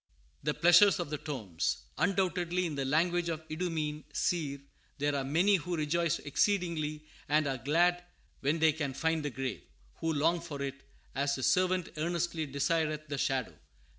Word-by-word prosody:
"The 150 +1 -1
pleasures 175 +4 +6
of 170 -4 -3
the 150 - -2
tombs!" 110 - -3 0.2
Undoubtedly, 180 -2 +1
in 165 - -2
the 140 -1 -2
language 170 +4 +1
of 160 -1 -4
the - - -6
Idumean, 155 -3 -2
seer, 150 -5 -1 0.4
there 145 0 0
are 140 - 0
many 175 +9 +3
who 175 +1 -3
"rejoice 170 +2 +1
exceedingly 155 -2 0 0.2
and 155 +1 +3
are 135 -2 -2
glad 175 +7 +2 0.4
when 145 +4 +1
they 160 -1 +5
can 145 -4 -3
find 160 0 +1
the 145 - -1
grave;" 130 -3 -4 0.4
who 165 - -1
long 160 +3 +2
for 160 -4 -7
it 135 0 -5 0.3
"as 140 +1 0
the 130 - -5
servant 185 +2 +2
earnestly 170 0 -1
desireth 155 +2 -1
the 140 -1 -3
shadow." 130 -4 0
155 Hz, 165 wpm, -31 LUFS, 145-175 Hz, 0.4 s, pleasures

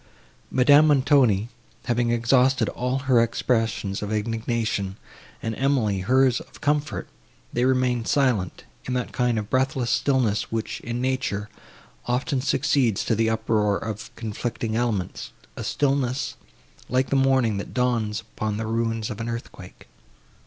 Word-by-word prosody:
Madame 145 +4 +6
Montoni, 130 -7 +3 0.4
having 120 -1 +1
exhausted 125 +3 +3
all 125 +2 -2
her 125 -3 +5
expressions 115 -4 0
of 105 0 -4
indignation, 110 -2 -2 0.5
and 115 - -2
Emily, 120 -6 +1
hers 125 +5 +3
of - - -14
comfort, 150 +1 -1 0.5
they 120 +1 +1
remained 125 -2 +1
silent, 125 -10 +1 0.2
in 130 - -2
that 125 -1 -2
kind 125 -2 +1
of 105 0 -4
breathless 130 -2 +1
stillness, 125 -7 +1
which, 115 -1 -3
in 120 +1 -4
nature, 125 -6 -1 0.6
often 130 +2 0
succeeds 125 -5 +1
to - - +1
the 110 +1 +2
uproar 110 -2 +1
of 110 -1 -6
conflicting 110 0 -3
elements; 110 -6 -2 0.2
a - - -5
stillness, 135 -2 0 0.6
like 130 +1 +1
the - - +3
morning, 130 -5 +3
that 100 - -6
dawns 115 -4 0
upon 110 -1 -4
the 110 - -3
ruins 115 -1 -1
of 110 +1 -6
an 115 - -3
earthquake. 115 -6 -8
120 Hz, 140 wpm, -24 LUFS, 110-130 Hz, 0.6 s, Madame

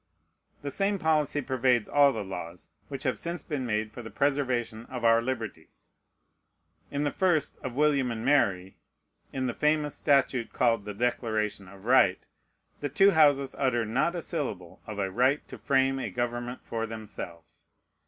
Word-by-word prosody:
The 140 - -3
same 200 +6 +1
policy 155 -4 +1
pervades 125 -3 +1
all 145 -1 +5
the 110 -5 -4
laws 90 -2 -8 0.2
which 135 -2 -6
have 130 -4 -1
since 170 +1 -4
been 140 -6 -3
made 110 -1 -1
for 120 - -8
the 115 - -8
preservation 125 -5 -1
of 125 -2 -5
our 115 0 +5
liberties. 115 -9 -6 1.0
In 145 +1 -2
the 145 - 0
1st 175 -3 +1
of 125 -2 -6
William 140 -3 +2
and 115 0 -4
Mary, 95 -10 +2 0.5
in 130 -1 -2
the 125 - -1
famous 150 0 +1
statute 135 -4 +1
called 115 -4 +2
the 105 -1 -6
Declaration 110 -4 -1
of 95 +2 -14
Right, 120 -7 +4 0.5
the 145 - -3
two 195 +9 +5
Houses 145 -5 +4
utter 120 -4 +1
not 130 +10 0
a 170 - -3
syllable 105 - -4
of 105 -2 -6
"a 95 -2 -1
right 130 +7 +2
to - - -9
frame 135 -1 +2
a - - -3
government 120 +1 -3
for 115 0 -3
themselves." 85 -7 -9
125 Hz, 165 wpm, -28 LUFS, 110-145 Hz, 1.0 s, all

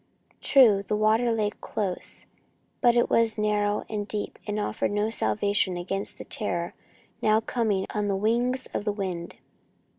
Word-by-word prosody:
True, 230 -8 +6
the 205 +1 -2
water 220 +3 +3
lay 215 -2 0
close, 195 -4 -5 0.6
but 240 -2 +5
it 240 - +4
was 225 -1 +2
narrow 210 -1 +1
and 210 -2 -3
deep 210 -1 -4
and 210 0 -1
offered 210 - -1
no 210 +2 0
salvation 200 -4 0
against 195 +3 -4
the - - -8
terror 175 -5 -2 0.5
now 215 0 +4
coming 220 -4 0
on 210 -1 -1
the 200 - +1
wings 240 +5 +1
of - - -2
the 210 - 0
wind. 185 -4 -4
210 Hz, 155 wpm, -26 LUFS, 200-220 Hz, 0.6 s, True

